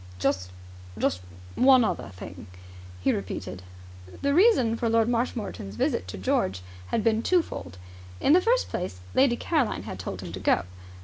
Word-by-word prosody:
"Just 90 Hz, 0 st, 0 dB, 0.5 s
just 90 Hz, -, 0 dB, 0.3 s
one 255 Hz, -1 st, +6 dB
other 220 Hz, -, -2 dB
thing," 90 Hz, -1 st, -10 dB, 0.5 s
he -, -, +2 dB
repeated. 95 Hz, -1 st, -5 dB, 0.6 s
The 280 Hz, 0 st, +2 dB
reason 305 Hz, -, +5 dB
for 230 Hz, 0 st, -1 dB
Lord 225 Hz, 0 st, +3 dB
Marshmoreton's 230 Hz, -, -2 dB
visit 90 Hz, -, 0 dB
to 95 Hz, -, -6 dB
George 95 Hz, 0 st, 0 dB, 0.2 s
had 215 Hz, -, 0 dB
been 225 Hz, 0 st, +2 dB
twofold. 230 Hz, -, -1 dB, 0.4 s
In 285 Hz, -, +4 dB
the 360 Hz, -, +6 dB
first -, -, +2 dB
place, 135 Hz, -, -4 dB
Lady 260 Hz, -2 st, +4 dB
Caroline 285 Hz, -4 st, 0 dB
had 95 Hz, -, -7 dB
told 95 Hz, +1 st, -5 dB
him 90 Hz, -2 st, -7 dB
to 95 Hz, -, -6 dB
go. 95 Hz, -, +2 dB
220 Hz, 160 wpm, -26 LUFS, -, 0.6 s, one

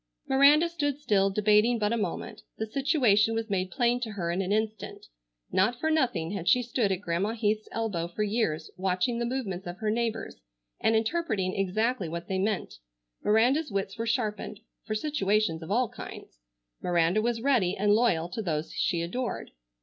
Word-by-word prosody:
Miranda 285 Hz, +5 st, +6 dB
stood 290 Hz, -5 st, -2 dB
still 200 Hz, -9 st, +2 dB
debating 210 Hz, +4 st, +3 dB
but 210 Hz, 0 st, 0 dB
a -, -, +2 dB
moment. 220 Hz, -, -4 dB, 0.2 s
The 220 Hz, -, -2 dB
situation 225 Hz, -4 st, +2 dB
was 225 Hz, -1 st, -3 dB
made 185 Hz, -1 st, 0 dB
plain 240 Hz, +2 st, +1 dB
to 225 Hz, -3 st, -4 dB
her 170 Hz, -4 st, -2 dB
in 180 Hz, +3 st, 0 dB
an 190 Hz, 0 st, -2 dB
instant. 220 Hz, +1 st, -2 dB, 0.5 s
Not 220 Hz, +6 st, +2 dB
for 315 Hz, +3 st, 0 dB
nothing 215 Hz, -, +1 dB
had 180 Hz, -3 st, -1 dB
she 250 Hz, -, +4 dB
stood 235 Hz, -4 st, 0 dB
at 190 Hz, 0 st, -1 dB
Grandma 190 Hz, +4 st, -1 dB
Heath's 215 Hz, -1 st, -1 dB
elbow 205 Hz, -7 st, -2 dB
for 175 Hz, +5 st, -3 dB
years 210 Hz, -7 st, -1 dB
watching 190 Hz, +6 st, 0 dB
the 235 Hz, -, -1 dB
movements 200 Hz, -8 st, -3 dB
of 175 Hz, +1 st, -6 dB
her 215 Hz, 0 st, -1 dB
neighbors 225 Hz, 0 st, -2 dB, 0.4 s
and 225 Hz, -, +2 dB
interpreting 220 Hz, -, 0 dB
exactly 200 Hz, +1 st, 0 dB
what 170 Hz, +1 st, -5 dB
they 190 Hz, -1 st, -1 dB
meant. 200 Hz, -, -2 dB, 0.4 s
Miranda's 250 Hz, +9 st, +3 dB
wits 195 Hz, -1 st, -2 dB
were 230 Hz, -, -2 dB
sharpened 215 Hz, -3 st, -2 dB, 0.3 s
for 215 Hz, -, -1 dB
situations 215 Hz, -, 0 dB
of 160 Hz, -, -8 dB
all 240 Hz, +4 st, +2 dB
kinds. -, -, -10 dB, 0.4 s
Miranda 175 Hz, +3 st, +2 dB
was 230 Hz, 0 st, -1 dB
ready 220 Hz, -10 st, +2 dB
and 205 Hz, +1 st, +3 dB
loyal 210 Hz, -8 st, +2 dB
to 205 Hz, +5 st, -4 dB
those 160 Hz, -5 st, -3 dB
she 170 Hz, -2 st, 0 dB
adored. 245 Hz, +9 st, -4 dB
215 Hz, 180 wpm, -28 LUFS, 190-240 Hz, 0.5 s, Miranda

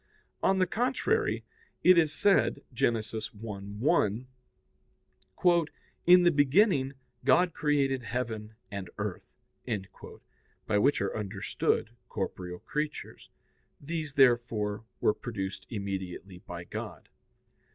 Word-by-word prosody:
On 190 Hz, 0 st, +3 dB
the 185 Hz, -, +4 dB
contrary, 260 Hz, -, 0 dB, 0.4 s
It 185 Hz, -, +8 dB
is 160 Hz, -3 st, +4 dB
said 195 Hz, +5 st, +3 dB
(Gen. 120 Hz, -1 st, +2 dB
1:1): 110 Hz, -, -1 dB, 1.8 s
"In 180 Hz, 0 st, +8 dB
the 175 Hz, -, +6 dB
beginning 145 Hz, -1 st, +3 dB, 0.3 s
God 180 Hz, -2 st, +4 dB
created 140 Hz, -3 st, +1 dB
heaven 110 Hz, -3 st, -4 dB, 0.2 s
and 100 Hz, -3 st, -5 dB
earth"; 105 Hz, -3 st, -5 dB, 1.3 s
by 105 Hz, -1 st, +2 dB
which 140 Hz, +3 st, +3 dB
are 100 Hz, -, -1 dB
understood 105 Hz, +1 st, -1 dB, 0.2 s
corporeal 90 Hz, -1 st, -4 dB
creatures. 150 Hz, +9 st, -5 dB, 0.5 s
These, 155 Hz, -1 st, -4 dB
therefore, 115 Hz, -5 st, +2 dB, 0.2 s
were 105 Hz, -, +4 dB
produced 100 Hz, -6 st, -5 dB
immediately 95 Hz, -3 st, -5 dB
by 85 Hz, -1 st, -8 dB
God. -, -, -7 dB
120 Hz, 100 wpm, -29 LUFS, 105-150 Hz, 1.8 s, It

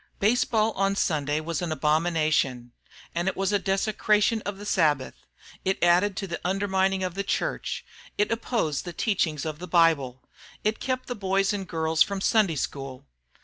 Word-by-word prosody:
Baseball 220 Hz, 0 st, +2 dB
on 195 Hz, -1 st, 0 dB
Sunday 150 Hz, -5 st, 0 dB
was 165 Hz, +1 st, -3 dB
an 175 Hz, -2 st, -2 dB
abomination, 155 Hz, -6 st, +1 dB, 0.4 s
it 175 Hz, +3 st, -1 dB
was 195 Hz, +1 st, 0 dB
a 205 Hz, -, +3 dB
desecration 210 Hz, +3 st, +1 dB
of 200 Hz, -1 st, -4 dB
the 205 Hz, -, -9 dB
Sabbath, 150 Hz, -9 st, +1 dB, 0.5 s
it 190 Hz, 0 st, 0 dB
added 180 Hz, +3 st, +4 dB
to 200 Hz, -, -2 dB
the 170 Hz, -2 st, -5 dB
undermining 190 Hz, 0 st, +1 dB
of 180 Hz, -1 st, -2 dB
the 195 Hz, -, -2 dB
church, -, -, -2 dB, 0.3 s
it 210 Hz, -, +1 dB
opposed 225 Hz, -, -1 dB
the 175 Hz, -, -7 dB
teachings 165 Hz, -, 0 dB
of 155 Hz, -1 st, -4 dB
the 180 Hz, -, -7 dB
Bible, 155 Hz, -7 st, +2 dB, 0.4 s
it 215 Hz, +1 st, 0 dB
kept 255 Hz, -1 st, -2 dB
the 245 Hz, -, -4 dB
boys 195 Hz, -2 st, +1 dB
and 195 Hz, -2 st, -4 dB
girls 160 Hz, -1 st, -1 dB
from 200 Hz, -1 st, +3 dB
Sunday 195 Hz, -4 st, +2 dB
school. 135 Hz, -2 st, -5 dB
185 Hz, 165 wpm, -26 LUFS, 155-200 Hz, 0.5 s, added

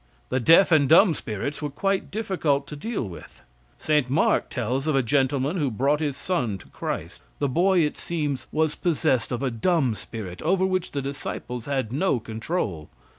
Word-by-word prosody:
The 130 Hz, -, +1 dB
deaf 165 Hz, +9 st, +6 dB
and 145 Hz, -4 st, +4 dB
dumb 170 Hz, +2 st, +7 dB
spirits 130 Hz, +4 st, -4 dB
were 150 Hz, -, -2 dB
quite 195 Hz, +7 st, -1 dB
difficult 175 Hz, -10 st, 0 dB
to 150 Hz, -, -6 dB
deal 160 Hz, -, -3 dB
with. 85 Hz, -3 st, -12 dB, 0.3 s
St. 150 Hz, -4 st, +1 dB
Mark 145 Hz, +5 st, +2 dB
tells 130 Hz, +4 st, -2 dB
of 155 Hz, -, +2 dB
a 135 Hz, -, +3 dB
gentleman 135 Hz, +5 st, +1 dB
who 145 Hz, -5 st, +1 dB
brought 135 Hz, +6 st, +1 dB
his 145 Hz, -3 st, -2 dB
son 125 Hz, -, -1 dB
to -, -, -16 dB
Christ. -, -, -5 dB, 0.2 s
The 145 Hz, -, 0 dB
boy, 180 Hz, +6 st, +3 dB
it 150 Hz, -2 st, 0 dB
seems, 150 Hz, -6 st, -3 dB
was 155 Hz, -1 st, +1 dB
possessed 145 Hz, -9 st, 0 dB
of 125 Hz, +2 st, -2 dB
a 130 Hz, -, 0 dB
dumb 135 Hz, +1 st, +1 dB
spirit, 105 Hz, -4 st, -8 dB
over 190 Hz, +3 st, +2 dB
which 185 Hz, -1 st, -1 dB
the 140 Hz, -2 st, -2 dB
disciples 125 Hz, -3 st, -5 dB
had 130 Hz, -5 st, -1 dB
no 145 Hz, -2 st, +1 dB
control. 110 Hz, -, -3 dB
140 Hz, 180 wpm, -25 LUFS, 125-165 Hz, 0.3 s, dumb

